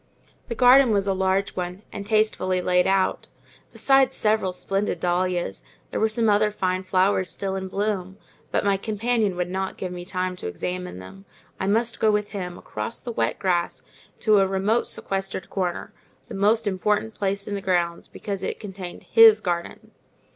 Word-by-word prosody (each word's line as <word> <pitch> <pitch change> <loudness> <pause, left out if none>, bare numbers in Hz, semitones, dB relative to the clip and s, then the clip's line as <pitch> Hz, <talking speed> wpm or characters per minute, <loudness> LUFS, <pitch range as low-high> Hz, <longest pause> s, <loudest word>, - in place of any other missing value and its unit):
The 235 - -4
garden 255 +2 +6
was 200 -2 +2
a 195 - +1
large 190 +1 0
one, 180 +2 -5
and 200 0 -6
tastefully 215 -4 +1
laid 180 0 +2
out; 190 0 +1 0.4
besides 270 -1 +3
several 215 -3 +1
splendid 195 0 -1
dahlias, 175 - -1 0.3
there - - -2
were 220 - +2
some 225 +1 +1
other 210 0 +4
fine 185 -3 -1
flowers 185 0 +1
still 190 +3 -3
in 190 0 -4
bloom: 195 -1 -2 0.3
but - - 0
my 200 -1 +3
companion 215 -1 0
would 180 0 -2
not 190 0 -3
give 185 - -4
me 175 -1 -6
time 185 0 -3
to - - -5
examine 180 - -5
them: 95 +1 -12 0.3
I 190 - -1
must 225 +3 +1
go 220 - +3
with 210 -1 0
him, 180 -4 -5
across 110 +1 -5
the 240 - -6
wet 115 - -1
grass, 175 -3 -1 0.4
to 215 -2 +5
a 195 - +3
remote 195 +5 +1
sequestered 195 -2 -3
corner, 180 -3 -3 0.4
the - - -7
most 215 +3 +2
important 210 +3 0
place 200 -1 -2
in 205 - -4
the 200 - -3
grounds, 175 -3 0
because 200 -2 -6
it - - -4
contained 190 -4 -8
his 225 -1 +7
garden. 175 -4 -4
195 Hz, 175 wpm, -24 LUFS, 180-210 Hz, 0.4 s, his